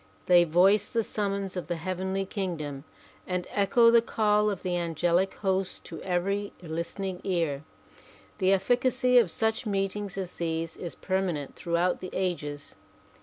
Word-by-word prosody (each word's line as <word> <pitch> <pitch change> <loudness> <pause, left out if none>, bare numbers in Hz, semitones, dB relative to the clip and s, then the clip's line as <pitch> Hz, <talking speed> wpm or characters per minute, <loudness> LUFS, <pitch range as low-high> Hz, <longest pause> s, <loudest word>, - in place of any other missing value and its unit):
They 175 -1 +6
voice 190 +5 +4
the 230 -1 0
summons 200 -2 -2
of 180 -4 -4
the 175 - -1
heavenly 185 +3 -2
kingdom 160 -8 -4 0.4
and 180 -1 -2
echo 230 +4 +4
the 235 0 +6
call 210 -2 +2
of 200 -3 -4
the 180 -1 -1
angelic 175 +2 +1
hosts 190 -1 0
to - - -9
every 195 +3 -1
listening 180 +3 -4
ear. 165 -7 -1 0.8
The 185 -1 +3
etificacy 250 +5 +4
of 205 - -2
such 220 +5 0
meetings 195 0 -2
as 185 -2 -4
these 165 -1 -2
is 175 - -6
per 190 0 -1
manent 155 -7 -3
throughout 175 +1 0
the 185 - -6
ages. 150 -6 -3
185 Hz, 150 wpm, -28 LUFS, 175-200 Hz, 0.8 s, They